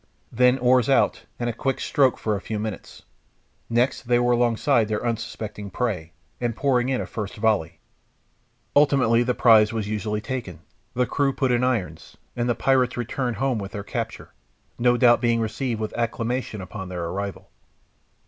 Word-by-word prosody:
Then 125 +2 +4
oars 125 0 +3
out, 135 - +2
and 120 - -1
a 120 - -1
quick 135 +3 -2
stroke 135 -3 +2
for 105 -1 -1
a 100 - -4
few 110 - -4
minutes. 110 -1 -6 0.7
Next 120 +3 +1
they 120 0 +4
were 120 0 +2
alongside 120 0 +2
their 105 +2 -2
unsuspecting 110 -3 -4
prey, 95 -7 -3 0.3
and 120 -2 -2
pouring 125 -1 +1
in 130 - 0
a - - -3
first 105 -3 -6
volley. 105 -7 0 1.0
Ultimately 135 -5 +4
the 125 0 0
prize 110 -3 +5
was 110 -3 -3
usually 105 0 -2
taken, 110 -5 -5 0.3
the 125 +1 +2
crew 140 +2 +1
put 130 -2 0
in 120 0 +2
irons, 95 -11 -2 0.2
and 120 0 -1
the 120 - +2
pirates 130 0 +2
returned 120 0 -2
home 130 0 0
with 100 0 -7
their 100 -2 -5
capture, - - -5 0.5
no 120 0 +3
doubt 120 -1 +5
being 115 -1 +2
received 115 +1 -2
with 110 -1 -4
acclamation 115 -1 -2
upon 95 0 -7
their 90 -2 -4
arrival. 100 +3 -5
120 Hz, 170 wpm, -24 LUFS, 105-125 Hz, 1.0 s, prize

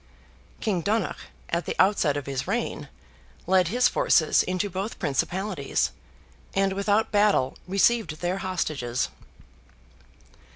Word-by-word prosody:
King 195 -6 0
Donogh, 210 +1 -1 0.2
at 170 +1 0
the - - -2
outset 185 -7 +3
of 145 - -4
his 135 -2 -3
reign, - - -2 0.6
led 185 -1 +3
his 245 +7 +3
forces 155 - +3
into 185 +2 -1
both 195 +3 -4
principalities, 175 +2 -1 0.6
and 195 0 +2
without 205 +2 +1
battle 205 -11 +3
received 195 -3 +2
their 180 +2 -1
hostages. 155 -10 -2
185 Hz, 115 wpm, -26 LUFS, 155-205 Hz, 0.6 s, outset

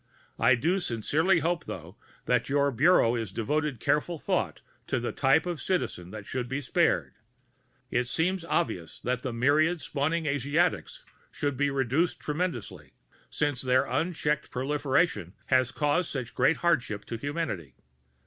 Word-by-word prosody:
_ - - -3
_I 125 -1 +5
do 175 +9 +2
sincerely 160 - +1
hope, 170 +2 -1
though, 85 +4 -8 0.3
that 125 -1 +1
your 140 0 +2
Bureau 130 -2 +4
is 115 -5 -3
devoting 145 +6 -1
careful 150 +8 0
thought - - -1 0.3
to 130 - 0
the 120 - -2
type 140 +4 +3
of 175 -6 -3
citizen 130 - -2
that 105 0 -8
should 125 +1 -4
be 135 - -1
spared. 130 - +1 0.8
It 125 0 +1
seems 175 +6 0
obvious 165 - -2
that 125 0 -1
the 130 - -3
myriad 150 +8 +2
spawning 155 +3 -1
Asiatics 150 - 0 0.3
should 145 -2 -2
be 140 +2 +1
reduced 135 +5 0
tremendously, 150 - -4 0.4
since 145 -4 -1
their 130 +1 +3
unchecked 150 +2 -1
proliferation 135 - 0 0.2
has 130 -1 +4
caused 150 +5 +1
such 125 -4 -5
great 135 +5 +3
hardship 120 -11 +1
to 115 - -5
humanity. 140 - -4
140 Hz, 150 wpm, -28 LUFS, 120-160 Hz, 0.8 s, I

